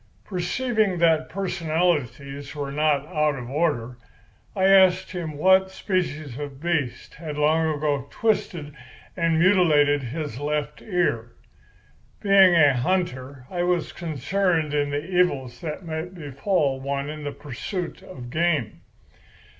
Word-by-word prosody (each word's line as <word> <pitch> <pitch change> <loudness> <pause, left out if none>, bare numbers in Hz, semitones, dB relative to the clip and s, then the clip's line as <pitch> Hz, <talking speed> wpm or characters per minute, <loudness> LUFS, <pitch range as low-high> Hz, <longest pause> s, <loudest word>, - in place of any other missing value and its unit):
Perceiving 210 +2 0
that 165 -2 +3
personalities 155 - -2
were 140 -2 -4
not 145 -1 +1
out 150 -3 0
of 125 0 -7
order, 135 -6 -1 0.6
I 190 -1 +2
asked 190 -1 +5
him 165 -5 -5
what 190 +4 +4
species 155 - -3
of 140 -2 -7
beast 145 -7 -2
had 150 -2 -7
long 160 +2 +2
ago 145 -2 -1
twisted 175 -9 -1 0.4
and 165 -2 +1
mutilated 160 -6 +4
his 135 0 -5
left 150 0 -3
ear. 170 - -1 0.9
Being 195 -3 +6
a 145 -4 +6
hunter, 130 -3 -2
I 175 -1 -2
was 175 -1 0
concerned 165 0 -1
in 145 -1 +1
the 145 +2 -3
evils 145 -9 0
that 160 +2 -5
may 160 0 -3
befall 150 -3 -1
one 140 +1 -2
in 150 0 -6
the 145 - -3
pursuit 165 - -6
of 120 -2 -10
game. 155 -8 0
155 Hz, 130 wpm, -24 LUFS, 140-180 Hz, 0.9 s, Being